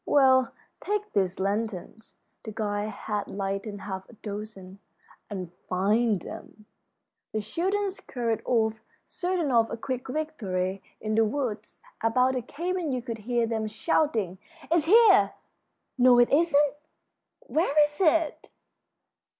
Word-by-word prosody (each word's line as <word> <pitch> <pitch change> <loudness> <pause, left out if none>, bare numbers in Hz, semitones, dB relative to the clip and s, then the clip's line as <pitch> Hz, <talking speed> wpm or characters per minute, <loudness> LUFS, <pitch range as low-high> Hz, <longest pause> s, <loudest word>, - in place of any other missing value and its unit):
Well, 260 -3 +5 0.3
take 415 +1 -2
these 190 -2 0
lanterns" 210 +1 -3 0.2
the 220 - -7
guide 210 -1 -2
had 210 -1 -4
lighted 195 +1 -4
half 190 -1 -6
a - - -14
dozen 200 -3 -8 0.5
"and 185 -4 -5 0.2
find 210 +3 +2
them." 210 +5 -10 0.7
The 215 - 0
children 385 - -1
scurried 235 - -3
off, 220 -2 +1 0.2
certain 355 -5 -1
of 230 -2 +4
a - - -4
quick 255 +2 -4
victory. 200 -11 -2 0.2
In 215 0 -2
the 225 +1 +4
woods 220 -3 -3 0.3
about 250 +3 +3
the 255 - -1
cabin 340 +5 -3
you 250 -2 -2
could 230 -2 -5
hear 240 -1 +2
them 220 -1 -2
shouting: 220 - 0 0.3
"It's 335 -3 +3
here!" 450 +6 +6 0.7
"No, 250 0 +7
it 240 0 +5
isn't!" 295 -2 +4 0.7
"Where 310 - +1
is 295 0 -2
it?" 325 -2 +2
230 Hz, 130 wpm, -27 LUFS, 210-295 Hz, 0.7 s, No